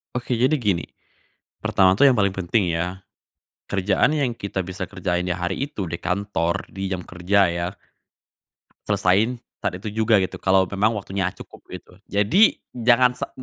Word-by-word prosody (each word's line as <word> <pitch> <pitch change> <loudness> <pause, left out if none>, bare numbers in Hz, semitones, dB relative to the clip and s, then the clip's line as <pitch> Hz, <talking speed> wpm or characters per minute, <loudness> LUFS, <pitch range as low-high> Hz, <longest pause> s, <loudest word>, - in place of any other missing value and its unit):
Oke 125 +1 -4
jadi 130 +5 +3
gini. 100 - -1 0.7
Pertama 95 -1 +4
tuh 140 +9 +6
yang 125 - +2
paling 100 -2 +2
penting 95 +2 0
ya, 90 +3 -2 0.7
kerjaan 95 0 +2
yang 135 -5 0
kita 100 -4 -4
bisa 95 +1 -6
kerjain 90 -2 -2
ya 90 - -1
hari 90 -1 -3
itu 105 -9 -5
di 85 -1 -5
kantor, 90 -3 -1
di 95 0 -4
jam 90 -2 -4
kerja 90 +1 +1
ya, 85 0 -2 1.2
selesaiin 105 +4 +2 0.2
saat - - -2
itu 105 0 -6
juga 110 +1 +3
gitu - - -6
kalau 95 0 +4
memang 100 +4 0
waktunya 95 -1 -2
cukup - - -13
gitu. - - -10 0.2
Jadi, 120 - +4 0.2
jangan 125 +1 +4
sa 125 - -5
100 Hz, 160 wpm, -23 LUFS, 90-110 Hz, 1.2 s, tuh